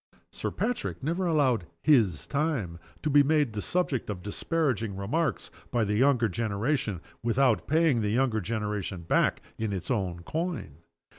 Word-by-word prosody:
Sir - - -3
Patrick 245 - -3
never 170 +5 0
allowed 130 - +2 0.2
"his 115 - +3
time" 140 - -1 0.2
to 155 - +1
be 145 +1 +7
made 145 -4 +2
the 105 - -3
subject 150 - -1
of 90 -4 -4
disparaging 115 - -1
remarks 120 +7 -1 0.2
by 120 -3 +1
the 105 - -1
younger 125 -1 +4
generation 110 - -1 0.2
without 120 +1 +2
paying 155 -6 +3
the 105 - 0
younger 115 -1 +1
generation 105 -3 -3
back 80 - +2 0.2
in 110 -2 -1
its 95 +4 -3
own 90 -7 -1
coin. 160 - -3
115 Hz, 150 wpm, -28 LUFS, 105-150 Hz, 0.2 s, be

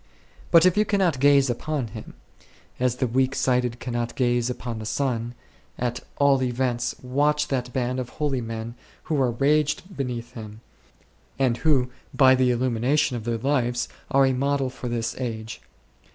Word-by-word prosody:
But 165 0 +6
if 185 - +4
you 210 - +5
cannot 190 -9 +1
gaze 140 0 +5
upon 130 0 -2
him, 110 +1 -10 0.6
as 125 -1 +1
the 130 - 0
weak 130 +2 +1
sighted 125 -2 +1
cannot 120 -1 -3
gaze 120 -1 +1
upon 120 -2 -5
the 110 - -6
sun, 120 -1 -2 0.4
at 120 0 -2 0.2
all 140 -2 +4
events 125 -1 -1
watch 150 +4 +1
that 125 -2 -2
band 125 0 -1
of 125 -1 -4
holy 145 -4 -2
men 115 0 -5 0.3
who 150 -4 0
are 130 - +3
ranged 150 - +1
beneath 125 -3 -4
him, 110 -2 -9 0.8
and 130 -3 +2
who 130 -5 +2 0.2
by 130 -2 +7
the 130 -1 +3
illu 125 +1 +1
mination 140 +6 +2
of 120 -3 -5
their 120 -1 -1
lives 125 -1 0 0.2
are 135 -2 +4
a 130 - +2
model 135 0 0
for 130 -1 -7
this 120 -1 -2
age. 110 -3 -5
125 Hz, 165 wpm, -24 LUFS, 120-140 Hz, 0.8 s, by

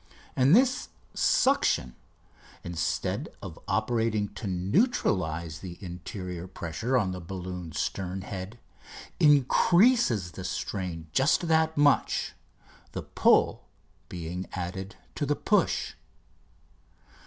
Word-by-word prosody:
And 135 +7 +5
this 260 +2 +3 0.2
suction, 260 - +2 0.7
instead 85 -1 -2
of - - -9
operating 110 -3 0
to 110 - -7
neutralise 90 - 0
the 90 0 -8
interior 90 -1 -6
pressure 95 +9 -2
on 100 -6 +1
the 90 - -5
balloon's 90 -2 -6
stern 95 0 -3
head, 95 +3 -7 0.6
increases 150 - +4
the 95 - -8
strain 90 -3 -4
just 145 +6 +3
that 160 -1 +2
much, 145 -1 +2 0.6
the - - -4
pull 85 - +2 0.4
being 90 +1 -5
added 95 +2 -5 0.2
to 145 - -2
the 145 - +2
push. - - +1
95 Hz, 100 wpm, -28 LUFS, 90-135 Hz, 0.7 s, And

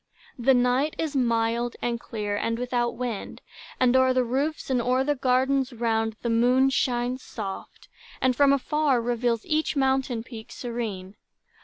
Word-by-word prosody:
The 260 +2 +4
night 250 +5 +2
is 310 -3 -3
mild 235 -1 +1
and 235 -1 -2
clear, 210 -3 -4
and 230 +2 -1
without 240 -1 -1
wind, 235 -4 -5 0.4
And 255 0 +3
o'er 260 0 +4
the 255 - +3
roofs, 275 +5 -2
and 250 -2 +2
o'er 255 +2 +1
the 295 +2 +1
gardens 265 0 +1
round 225 -1 0
The 235 - 0
moon 250 +4 +3
shines 250 -1 0
soft, 200 -6 -8 0.3
and 260 -1 +2
from 280 0 +5
afar 280 -1 +2
reveals 235 -1 -1
Each 310 0 0
mountain 265 -4 +1
peak 225 -2 -10
serene. 215 -6 -5
245 Hz, 155 wpm, -26 LUFS, 230-265 Hz, 0.4 s, from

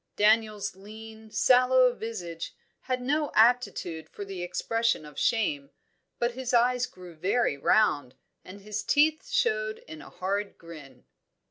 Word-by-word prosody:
Daniel's 215 -2 +2
lean, 220 +2 -12
sallow 255 +2 +4
visage 180 -9 -6 0.2
had 255 -1 -3
no 295 +3 0
aptitude 220 -8 +2
for 205 - -8
the 195 -2 -7
expression 225 +2 -1
of 150 -1 -9
shame, 145 -12 0 0.5
but 240 0 0
his 250 0 -2
eyes 250 +1 +3
grew 180 -6 -13
very 185 +2 0
round, 145 -5 +2 0.3
and 200 +2 -12
his 210 +1 -4
teeth 310 +9 +2
showed 215 - 0
in 155 -1 -9
a - - -12
hard 200 +2 -3
grin. 155 - -13
215 Hz, 135 wpm, -27 LUFS, 180-245 Hz, 0.5 s, sallow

